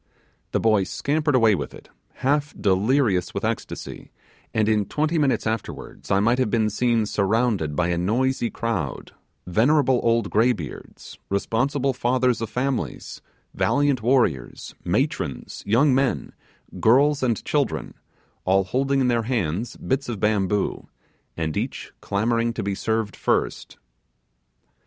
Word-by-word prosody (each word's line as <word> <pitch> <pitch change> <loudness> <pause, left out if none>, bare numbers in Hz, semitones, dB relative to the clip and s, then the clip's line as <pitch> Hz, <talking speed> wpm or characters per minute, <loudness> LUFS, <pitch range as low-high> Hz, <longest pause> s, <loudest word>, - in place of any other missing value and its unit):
The - - +1
boy 110 -3 +3
scampered 145 +4 0
away 115 -4 +5
with 95 - -4
it, - - -15 0.4
half 145 +2 +1
delirious 100 +1 +2
with - - -2
ecstasy, - - -5 0.4
and 110 -1 +1
in 105 -2 +2
twenty 155 +2 0
minutes 140 -3 +1
afterwards 110 0 -5
I 100 - +3
might 115 +5 +2
have 130 - +1
been 110 0 +1
seen 115 0 +1
surrounded 100 -6 0
by 90 +1 +1
a 85 -1 0
noisy 120 +6 0
crowd 100 - -3 0.3
venerable 125 - +3
old 115 -3 +1
graybeards 110 - -2
responsible 130 +7 0
fathers 125 -1 +1
of 115 - -3
families 130 0 -3 0.3
valiant 140 -3 +1
warriors 120 - 0
matrons - - -2
young 130 +7 +4
men 135 0 0 0.5
girls 140 +6 +4
and 120 -5 0
children, - - -1 0.5
all 95 +1 +3
holding 135 +7 0
in 130 - +2
their 120 -2 +2
hands 110 -1 -2
bits 135 0 -2
of 110 -4 -4
bamboo, 105 -1 0 0.5
and 80 -2 -2
each - - -4
clamouring 115 +3 0
to - - -4
be 100 0 -1
served 110 +1 -2
first. - - -1
115 Hz, 135 wpm, -23 LUFS, 100-130 Hz, 0.5 s, away